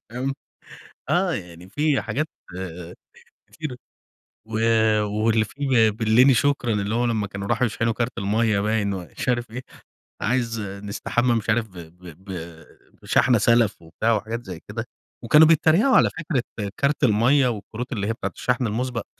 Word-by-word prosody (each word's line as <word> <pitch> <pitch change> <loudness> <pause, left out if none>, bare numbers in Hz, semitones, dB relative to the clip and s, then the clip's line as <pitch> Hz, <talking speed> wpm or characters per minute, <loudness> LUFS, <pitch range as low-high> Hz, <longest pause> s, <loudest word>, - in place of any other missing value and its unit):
فاهم؟ 130 +3 -3 0.7
آه. - - +2
يعني 85 +1 -8
في 145 +6 +1
حاجات 125 +8 -2 1.3
كتيرة. 150 -6 -6 0.7
و 110 - -11 0.5
واللي 110 +1 +1
فيه 130 -4 +2
بلِّني 110 +5 +4
شكرًا، 125 -1 +1
اللي 105 +2 -1
هو 120 - +1
لمّا 110 -3 0
كانوا 100 0 -6
راحوا 125 - +1
يشحنوا 115 +1 -1
كارت 120 +2 -3
المَيّة 105 +1 +1
باين 105 -1 0
ومش 90 +6 -5
عارف 120 -1 0
إيه، 125 +2 -6 0.6
عايز 115 -2 -1
نستحمى 105 +5 -1
مش 115 -1 -2
عارف 110 0 +1
ب 95 - -16
ب 85 +2 -13 0.2
ب 95 - -9 0.7
بشحنة 125 -2 +3
سَلَف 115 -3 +2
وبتاع 100 +8 -1
وحاجات 110 +3 -4
زي 90 -3 -7
كده. 110 +2 -4 0.4
وكانوا 150 +7 +6
بيتّريقوا 165 - +4
على - - +5
فكرة 125 - -4
كارت 140 +1 0
المَيّة 125 +6 +4
والكروت 115 +2 -5
اللي 100 -2 -2
هي 115 - 0
بتاعة 100 -3 -4
الشحن 125 -1 0
المُسبَق. 120 +2 -3
115 Hz, 150 wpm, -23 LUFS, 105-125 Hz, 1.3 s, وكانوا